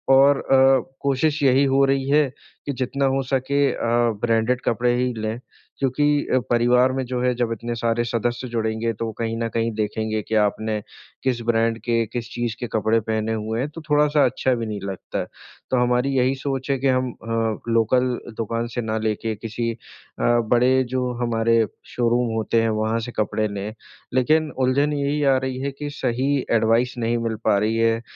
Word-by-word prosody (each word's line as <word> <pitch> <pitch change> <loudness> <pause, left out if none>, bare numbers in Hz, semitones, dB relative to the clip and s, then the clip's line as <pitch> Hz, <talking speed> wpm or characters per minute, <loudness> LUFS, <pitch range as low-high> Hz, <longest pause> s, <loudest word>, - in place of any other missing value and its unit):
और 140 +1 +5
अ, 135 0 +5 0.2
कोशिश 145 +2 +1
यही 135 +1 +4
हो 140 - +5
रही 135 0 0
है 145 -1 +4 0.4
कि 145 - -2
जितना 140 +2 -1
हो 135 - +1
सके 140 +2 +1
अ, - - -7 0.4
ब्रांडेड 120 +2 +1
कपड़े 120 +2 +1
ही 125 -1 -1
लें 110 +2 -3 0.4
क्योंकि 135 +2 +1 0.4
परिवार 125 +2 +4
में 135 0 -1
जो 125 -1 -2
है 125 0 +2
जब 120 -1 -1
इतने 120 +2 -4
सारे 115 0 0
सदस्य 120 +2 -2
जुड़ेंगे 110 0 -1
तो 110 +1 -4
कहीं 115 0 -1
न - - 0
कहीं 115 +1 -1
देखेंगे 110 0 -2
कि 110 - -3
आपने 105 0 +1 0.4
किस 125 -3 0
ब्रांड 115 0 +2
के, 115 0 0
किस 115 +1 -6
चीज़ 120 -2 -2
के 120 - -3
कपड़े 110 +1 +2
पहने 110 0 -2
हुए 110 +1 -3
हैं 140 +3 -1
तो 165 +2 -9
थोड़ा-सा 150 -1 +4
अच्छा 130 +1 +1
भी 115 -1 -3
नहीं 105 -2 -4
लगता 95 -2 -5
है। - - -2 0.5
तो 130 - +3
हमारी 125 +2 +1
यही 130 +1 +2
सोच 135 0 -4
है 135 - +1
कि 135 - +1
हम 130 -1 +1
अ, 115 -1 -2
लोकल 125 +2 +2 0.2
दुकान 115 +1 -2
से 120 - 0
ना 110 0 -2
लेके 110 0 -2
किसी 115 +2 -3
अ, 115 - -8 0.4
बड़े 120 +2 +3
जो 125 -1 0
हमारे 115 -1 +2 0.3
शोरूम 120 -1 +1
होते 110 +1 +1
हैं 115 - +1
वहाँ 110 +1 0
से - - -6
कपड़े 110 0 0
लें। 100 +1 -5 0.4
लेकिन 155 +5 +2
उलझन 135 +3 +2
यही 145 +1 0
आ - - +3
रही 130 0 -3
है 140 0 -2
कि 145 0 -4
सही 130 +2 0 0.2
एडवाइस 115 +2 +2
नहीं 120 0 0
मिल 115 -1 -2
पा 100 - +4
रही 110 +2 0
है, 115 0 +2
120 Hz, 190 wpm, -22 LUFS, 115-130 Hz, 0.5 s, और